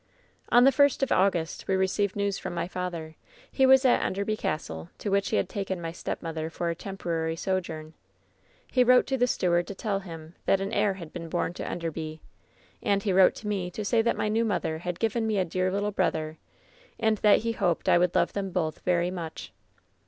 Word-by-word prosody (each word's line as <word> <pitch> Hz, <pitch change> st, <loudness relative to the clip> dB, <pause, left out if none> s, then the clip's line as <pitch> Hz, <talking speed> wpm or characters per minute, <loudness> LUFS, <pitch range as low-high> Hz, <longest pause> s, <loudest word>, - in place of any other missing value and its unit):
"On 245 Hz, +1 st, +6 dB
the 270 Hz, -, +7 dB
first 285 Hz, -1 st, +3 dB
of 270 Hz, -, 0 dB
August 180 Hz, -4 st, +1 dB
we 190 Hz, -, +2 dB
received 190 Hz, +1 st, 0 dB
news 200 Hz, -1 st, -1 dB
from 175 Hz, -, -5 dB
my 170 Hz, -, -2 dB
father. 175 Hz, -4 st, -5 dB, 0.4 s
He 265 Hz, -, +3 dB
was 265 Hz, 0 st, +6 dB
at 250 Hz, -, +4 dB
Enderby 200 Hz, +3 st, -1 dB
Castle, 85 Hz, -, -4 dB
to 205 Hz, -, -4 dB
which 200 Hz, 0 st, +2 dB
he -, -, 0 dB
had -, -, +1 dB
taken 195 Hz, -3 st, -3 dB
my 165 Hz, -1 st, -4 dB
stepmother 160 Hz, -1 st, -4 dB
for 170 Hz, +1 st, -2 dB
a -, -, -4 dB
temporary 165 Hz, -4 st, -3 dB
sojourn. 165 Hz, -4 st, -3 dB, 0.7 s
He 255 Hz, -, +3 dB
wrote 250 Hz, 0 st, +5 dB
to 270 Hz, -, -1 dB
the 245 Hz, -, +4 dB
steward 175 Hz, -6 st, +1 dB
to 200 Hz, -, -6 dB
tell 200 Hz, -1 st, -1 dB
him 165 Hz, -4 st, -10 dB
that 195 Hz, -, +4 dB
an 195 Hz, +1 st, -3 dB
heir 200 Hz, -2 st, +2 dB
had 170 Hz, -4 st, -10 dB
been 165 Hz, -2 st, -6 dB
bom 175 Hz, 0 st, -1 dB
to -, -, -6 dB
Enderby; 160 Hz, -2 st, -4 dB, 0.6 s
and 200 Hz, -1 st, +1 dB
he 200 Hz, -, +1 dB
wrote 185 Hz, 0 st, +6 dB
to 215 Hz, -, -8 dB
me 195 Hz, -4 st, -1 dB
to 210 Hz, +4 st, -5 dB
say 225 Hz, +2 st, +3 dB
that 235 Hz, -, 0 dB
my -, -, 0 dB
new 220 Hz, +2 st, +1 dB
mother 175 Hz, -7 st, -1 dB
had 180 Hz, 0 st, -4 dB
given 225 Hz, 0 st, 0 dB
me 215 Hz, -2 st, 0 dB
a 190 Hz, -, +2 dB
dear 185 Hz, +2 st, -1 dB
little 205 Hz, +2 st, -1 dB
brother, 155 Hz, -5 st, -1 dB, 0.6 s
and 220 Hz, -2 st, +2 dB
that 210 Hz, -1 st, +5 dB
he 230 Hz, +1 st, -1 dB
hoped 185 Hz, -7 st, 0 dB
I -, -, +5 dB
would 180 Hz, 0 st, +1 dB
love -, -, +2 dB
them 195 Hz, -1 st, -2 dB
both 165 Hz, -4 st, -2 dB
very 180 Hz, 0 st, +1 dB
much. 170 Hz, -3 st, -7 dB
185 Hz, 215 wpm, -27 LUFS, 170-210 Hz, 0.7 s, the